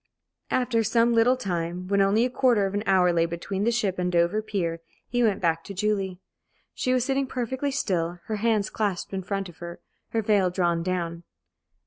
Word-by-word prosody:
After 245 -3 +1
some 230 +2 +3
little 235 +3 +4
time, 180 -4 -3
when 200 +1 +2
only 205 +4 +3
a - - 0
quarter 240 -6 +3
of 195 - -3
an 205 - 0
hour 185 -2 +4
lay 165 0 +2
between 190 +4 -3
the 235 - +3
ship 205 -6 -1
and 180 0 0
Dover 175 +5 +2
pier, 185 -6 -2 0.3
he 245 0 0
went 215 -4 +2
back 165 -2 +1
to 200 - -8
Julie. 195 -2 -1 0.5
She 255 - -1
was 255 -1 +2
sitting 270 0 0
perfectly 260 +3 -2
still, 175 -10 -1
her 215 - -3
hands 215 -1 +1
clasped 200 -4 -2
in 190 - -2
front 195 +1 -3
of 175 - -14
her, 170 0 -8 0.3
her 225 -1 -1
veil 200 -3 +3
drawn 175 -2 0
down. 170 -1 -2
200 Hz, 195 wpm, -26 LUFS, 175-230 Hz, 0.5 s, little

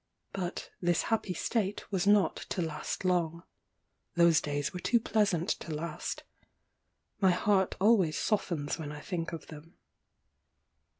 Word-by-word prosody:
But 180 -2 -4
this 175 -2 +2
happy 200 -4 0
state 210 +2 -2
was 190 -1 0
not 205 -1 +5
to 180 - -3
last 160 +3 -4
long. 170 -2 +1 0.7
Those 170 -2 +5
days 145 0 -2
were 180 - -4
too 235 +6 +3
pleasant 205 -7 +1
to 165 - -2
last. 155 0 -4 1.0
My 190 -2 +5
heart 190 +1 +2
always 195 -6 +4
softens 170 -9 -1
when 150 -2 -5
I 150 - -7
think 170 -2 -3
of 165 - -6
them. 155 +2 -12
175 Hz, 135 wpm, -31 LUFS, 160-195 Hz, 1.0 s, not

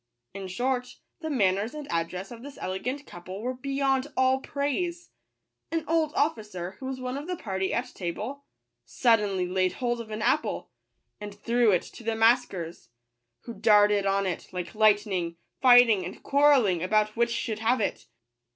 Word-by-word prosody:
In 195 -1 -6
short, 250 +5 -2 0.2
the 315 -1 -4
manners 210 -1 +1
and 300 -1 -6
address 175 +4 -3
of 235 -1 -9
this 280 +2 -10
elegant 250 +10 -4
couple 185 +4 -9
were 255 +1 -1
beyond 270 +1 0
all 260 0 +3
praise. 335 +6 -3 0.6
An 325 -1 -1
old 320 -2 +2
officer, 210 - -2
who 260 - -6
was 265 -1 -4
one 255 +2 -3
of 295 - -8
the 360 - -2
party 190 - -3
at 250 +1 -2
table, 215 +10 -5 0.4
suddenly 210 -6 +2
laid 185 0 +1
hold 240 -1 -2
of 225 - -10
an 215 0 -4
apple, 290 +6 0 0.5
and 205 -1 -7
threw 235 +2 +2
it 180 -4 +3
to - - -12
the 225 0 -1
maskers, 220 -7 +1 0.5
who 235 - -8
darted 205 -2 +4
on 195 0 +1
it 180 -3 -3
like 180 -1 -5
lightning, 205 -5 +2 0.3
fighting 245 -6 +7
and 180 - -8
quarrelling 275 - +4
about 215 +3 +1
which 235 0 +1
should 225 -2 -2
have 230 +3 +2
it. 205 - -2
225 Hz, 165 wpm, -27 LUFS, 195-260 Hz, 0.6 s, fighting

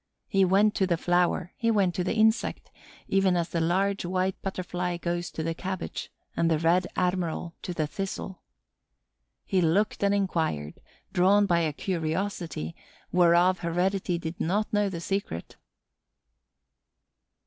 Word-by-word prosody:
He 195 0 +3
went 200 +3 +4
to 190 - +1
the 170 -2 +1
flower, 175 +1 +1
he 230 - 0
went 200 -5 +3
to 180 - -1
the 185 - -1
insect, 220 +1 +1 0.4
even 195 -2 +3
as 170 0 -1
the 170 - -1
Large 195 +4 +1
White 185 +1 0
Butterfly 180 -2 -3
goes 175 0 -2
to 160 - -5
the 165 +1 -1
cabbage 185 +2 -5 0.2
and 165 - +2
the 160 - +3
Red 170 +3 +2
Admiral 180 -2 -1
to - - -5
the 160 -3 -1
thistle. 190 +2 -5 1.0
He 190 -2 +1
looked 190 +6 +1
and 200 - +4
inquired, 165 - -1 0.3
drawn 200 +3 +5
by 175 -3 +3
a 160 -2 +1
curiosity 165 - -3 0.4
whereof 180 +1 +4
heredity 180 +1 0
did 165 0 -6
not 205 +7 0
know 205 -1 +2
the 170 -3 -5
secret. 195 - -3
180 Hz, 145 wpm, -27 LUFS, 170-195 Hz, 1.0 s, drawn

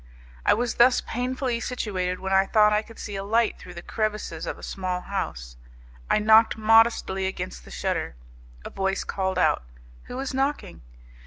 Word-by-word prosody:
I - - +6
was 240 +1 -1
thus 245 +1 +6
painfully 250 0 -2
situated 185 -7 -3
when 190 0 -2
I 195 0 +4
thought 210 0 +4
I 210 - +2
could 225 +1 -15
see 205 - -6
a 195 - -4
light 225 +2 +1
through 180 - -11
the 170 - -8
crevices 210 -7 -3
of - - -4
a - - -14
small 185 -1 -3
house. - - -5 0.5
I - - +4
knocked 220 +1 +5
modestly 220 -3 +3
against 65 - -6
the - - -13
shutter. - - -3 0.5
A - - -7
voice 195 0 -1
called 190 -1 -2
out: 180 - +3 0.4
"Who 250 - -7
is 270 0 -3
knocking?" 270 - -2
210 Hz, 175 wpm, -25 LUFS, 190-230 Hz, 0.5 s, I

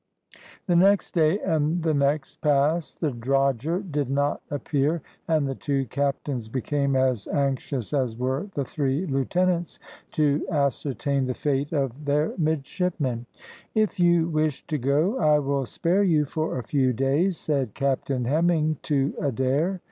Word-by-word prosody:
The 175 - +2
next 195 +3 +4
day 160 +1 +3
and 160 0 0
the 160 -1 +2
next 140 0 0
passed 150 +3 +1
the 155 -4 +1
drogher 135 - 0
did 145 -3 -1
not 145 +1 0
appear, 145 +1 -1 0.2
and 155 -4 +2
the 135 - -2
two 135 0 -1
captains 135 -2 -2
became 140 +2 0
as 130 -5 +1
anxious 135 -3 -2
as 125 -5 0
were 130 +9 -2
the 140 - -1
three 140 +5 -1
lieutenants 175 +4 0 0.4
to 150 -1 +2
ascertain 140 -2 0
the 125 - -2
fate 140 0 -1
of 140 -2 -2
their 145 +2 +1
midshipmen. 155 -5 -1 0.5
"If 215 -3 +1
you 170 -2 +4
wish 155 -3 -1
to 150 - -2
go 150 - +1
I 150 -1 +4
will 140 -2 -1
spare 180 +3 +1
you 160 -6 +3
for 155 0 -2
a 125 - -3
few 130 +1 +1
days," 145 - +1
said 135 -8 -2
Captain 135 -2 -1
Hemming 155 +2 +2
to 140 -2 0
Adair. 140 - 0
145 Hz, 150 wpm, -25 LUFS, 135-160 Hz, 0.5 s, next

